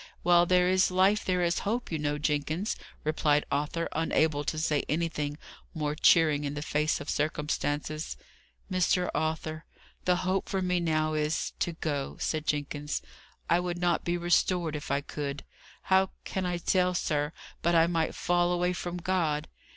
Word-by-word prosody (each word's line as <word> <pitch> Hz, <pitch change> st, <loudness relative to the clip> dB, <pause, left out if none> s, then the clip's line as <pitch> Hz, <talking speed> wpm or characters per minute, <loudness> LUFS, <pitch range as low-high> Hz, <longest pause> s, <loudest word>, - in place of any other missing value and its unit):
"While 175 Hz, 0 st, +5 dB
there 180 Hz, 0 st, +4 dB
is 185 Hz, +1 st, +4 dB
life 190 Hz, +3 st, +3 dB
there 180 Hz, -2 st, +1 dB
is 170 Hz, 0 st, +1 dB
hope, 230 Hz, +2 st, -2 dB
you 160 Hz, -, -1 dB
know, 145 Hz, 0 st, -1 dB
Jenkins," 155 Hz, +6 st, -1 dB, 0.3 s
replied 150 Hz, -1 st, +2 dB
Arthur, 150 Hz, +4 st, -1 dB
unable 155 Hz, -2 st, +1 dB
to 155 Hz, -, -2 dB
say 155 Hz, -2 st, +1 dB
anything 150 Hz, -2 st, -1 dB, 0.4 s
more 150 Hz, -2 st, -1 dB
cheering 155 Hz, -1 st, +4 dB
in 145 Hz, 0 st, -3 dB
the 150 Hz, -, -3 dB
face 150 Hz, 0 st, 0 dB
of 145 Hz, -, -8 dB
circumstances. 150 Hz, 0 st, -2 dB, 0.5 s
"Mr. 180 Hz, 0 st, +2 dB
Arthur, 155 Hz, +1 st, -2 dB, 0.4 s
the 180 Hz, -, +4 dB
hope 190 Hz, +1 st, 0 dB
for 195 Hz, -, 0 dB
me 180 Hz, -1 st, +1 dB
now 155 Hz, -2 st, +1 dB
is, 155 Hz, +1 st, -1 dB
to 175 Hz, -, 0 dB
go," 145 Hz, -4 st, -3 dB
said 155 Hz, -1 st, -2 dB
Jenkins. 145 Hz, 0 st, -2 dB, 0.4 s
"I 170 Hz, -, +4 dB
would 175 Hz, -1 st, -2 dB
not 175 Hz, -1 st, +1 dB
be 175 Hz, 0 st, 0 dB
restored 175 Hz, -1 st, +1 dB
if 150 Hz, -, -6 dB
I 140 Hz, +1 st, +1 dB
could. 140 Hz, -1 st, -5 dB, 0.4 s
How 190 Hz, 0 st, +3 dB, 0.2 s
can 190 Hz, -1 st, -2 dB
I 175 Hz, -1 st, -1 dB
tell, 180 Hz, +1 st, +1 dB
sir, 150 Hz, -3 st, 0 dB, 0.3 s
but 170 Hz, 0 st, +2 dB
I 165 Hz, 0 st, +6 dB
might 165 Hz, -2 st, 0 dB
fall 175 Hz, 0 st, +2 dB
away 180 Hz, 0 st, +1 dB
from 175 Hz, 0 st, -4 dB
God? 170 Hz, -4 st, 0 dB
160 Hz, 165 wpm, -29 LUFS, 150-180 Hz, 0.5 s, I